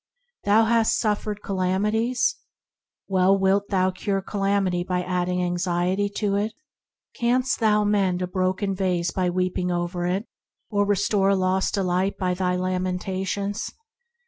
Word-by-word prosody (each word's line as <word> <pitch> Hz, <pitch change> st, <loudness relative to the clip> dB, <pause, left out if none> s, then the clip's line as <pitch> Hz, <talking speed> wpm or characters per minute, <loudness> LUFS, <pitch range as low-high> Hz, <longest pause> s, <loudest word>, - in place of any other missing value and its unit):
Thou 215 Hz, +2 st, +5 dB
hast 225 Hz, 0 st, +3 dB
suffered 210 Hz, -1 st, -1 dB
calamities? 210 Hz, +6 st, 0 dB, 0.7 s
Well, 190 Hz, 0 st, +3 dB
shalt 195 Hz, +1 st, +2 dB
thou 185 Hz, -1 st, +2 dB
cure 195 Hz, +1 st, -2 dB
calamity 195 Hz, -3 st, 0 dB
by 180 Hz, 0 st, -1 dB
adding 180 Hz, 0 st, -1 dB
anxiety 180 Hz, +3 st, 0 dB
to 205 Hz, -2 st, 0 dB
it? 210 Hz, +2 st, -2 dB, 0.6 s
Canst 250 Hz, +2 st, +1 dB
thou 210 Hz, -2 st, +3 dB
mend 195 Hz, -3 st, +1 dB
a -, -, -2 dB
broken 185 Hz, +2 st, -1 dB
vase 180 Hz, -3 st, 0 dB
by 185 Hz, -1 st, 0 dB
weeping 180 Hz, 0 st, -1 dB
over 175 Hz, 0 st, -2 dB
it, 190 Hz, +5 st, -1 dB, 0.5 s
or 205 Hz, -1 st, +1 dB
restore 200 Hz, 0 st, +2 dB
a 200 Hz, -, +4 dB
lost 190 Hz, 0 st, +1 dB
delight 190 Hz, 0 st, 0 dB
by 180 Hz, -2 st, 0 dB
thy 180 Hz, 0 st, 0 dB
lamentations 185 Hz, +3 st, -2 dB
190 Hz, 135 wpm, -24 LUFS, 180-205 Hz, 0.7 s, Thou